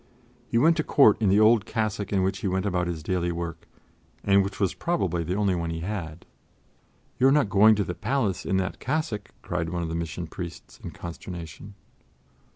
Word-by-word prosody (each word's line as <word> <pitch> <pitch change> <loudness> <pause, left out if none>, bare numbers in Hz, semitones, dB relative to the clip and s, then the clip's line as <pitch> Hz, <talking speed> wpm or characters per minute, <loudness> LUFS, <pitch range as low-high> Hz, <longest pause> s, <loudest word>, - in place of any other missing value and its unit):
He 115 - 0
went 160 +7 +4
to 155 - +1
Court 125 -8 +5
in 105 - +3
the 100 +2 +4
old 110 0 +5
cassock 105 -3 -2
in 95 -2 +2
which 95 +1 -1
he - - -2
went 95 +1 -1
about 90 -3 0
his 80 -3 -4
daily 85 0 -1
work, 85 -1 -6 0.6
and 100 0 +4
which 100 0 -6
was 95 -3 +1
probably 165 - -1
the 90 +3 -2
only 100 -2 +1
one 85 -2 -2
he 80 0 -4
had. 85 -4 -5 0.9
"You 130 - +5
are - - +5
not 140 -8 +2
going 110 +2 +6
to 105 - 0
the 90 - -4
palace 105 +1 -1
in 95 - 0
that 95 -1 -2
cassock?" 130 -8 -2
cried 80 +1 -2
one 85 0 -3
of 80 - -3
the 80 - -3
Mission 85 +1 -4
Priests 85 +1 -9
in - - -5
consternation. 85 +2 -8
95 Hz, 205 wpm, -26 LUFS, 85-105 Hz, 0.9 s, going